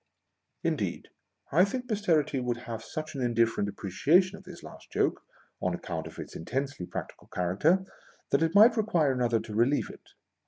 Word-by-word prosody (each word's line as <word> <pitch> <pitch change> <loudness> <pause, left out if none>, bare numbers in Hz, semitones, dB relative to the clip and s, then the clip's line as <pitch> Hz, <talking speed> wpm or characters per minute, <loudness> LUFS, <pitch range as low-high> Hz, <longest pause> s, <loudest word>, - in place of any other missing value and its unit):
Indeed, - - -2 0.4
I 170 +6 +6
think 250 +5 -2
Posterity 170 - +1
would 125 -1 -1
have 115 -1 -5
such 155 +6 -6
an 135 - -4
indifferent 115 -4 +1
appreciation 160 - +2
of 195 - -13
this 180 -1 -11
last - - -12
joke, - - +1 0.4
on - - 0
account 80 -2 -5
of 80 - -12
its - - -8
intensely 135 - -3
practical - - -7
character, 150 - +1 0.5
that 140 - +3
it 165 +2 +1
might 225 +3 +7
require 175 -10 +2
another 120 -3 +1
to 110 - -8
relieve 120 +7 +2
it. - - -17
140 Hz, 165 wpm, -29 LUFS, 115-180 Hz, 0.5 s, might